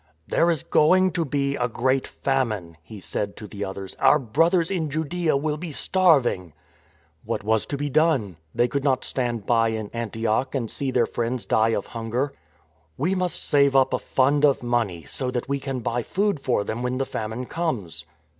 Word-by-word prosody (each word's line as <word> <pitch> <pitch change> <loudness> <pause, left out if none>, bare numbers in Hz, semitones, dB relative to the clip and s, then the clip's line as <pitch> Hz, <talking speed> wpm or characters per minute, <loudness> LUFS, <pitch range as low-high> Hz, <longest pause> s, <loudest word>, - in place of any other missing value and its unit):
" 80 - -42
There 170 - +4
is 165 -5 0
going 185 +4 +4
to 170 0 0
be 140 -1 -1
a 125 - 0
great 130 +3 0
famine," 110 -11 -1
he 100 +6 -11
said 100 +1 -4
to 105 - -8
the 105 -1 -6
others. 95 0 -6
" - - -27
Our - - +6
brothers 165 - +2
in 165 -5 -1
Judaea 160 +1 0
will 150 +1 -1
be 170 0 -6
starving." 140 - +2 0.7
What 110 -1 -3
was 110 +1 +1
to 140 - -3
be 145 +1 -2
done? 140 - +2 0.2
They 120 - +3
could 140 +3 -2
not 135 -3 +1
stand 120 -5 -2
by 115 0 +3
in 110 -2 -3
Antioch 115 +3 -1
and 120 -4 -2
see 140 - -2
their 125 -2 +2
friends 120 +1 -3
die 110 +1 +2
of - - -2
hunger. 120 +4 -3 0.3
" 80 - -39
We 170 +8 +1
must 180 -2 -2
save 140 -1 +4
up 135 -1 +4
a - - +1
fund 140 +2 +2
of 140 -4 +4
money, 115 -9 -1
so 130 - -4
that 125 -1 -3
we 140 0 -1
can 135 -2 -4
buy 120 +2 -1
food 200 - 0
for 125 -6 0
them 110 +3 -4
when 125 +1 -1
the 135 - 0
famine 110 +1 -4
comes." 110 - -3
130 Hz, 200 wpm, -24 LUFS, 110-145 Hz, 0.7 s, Our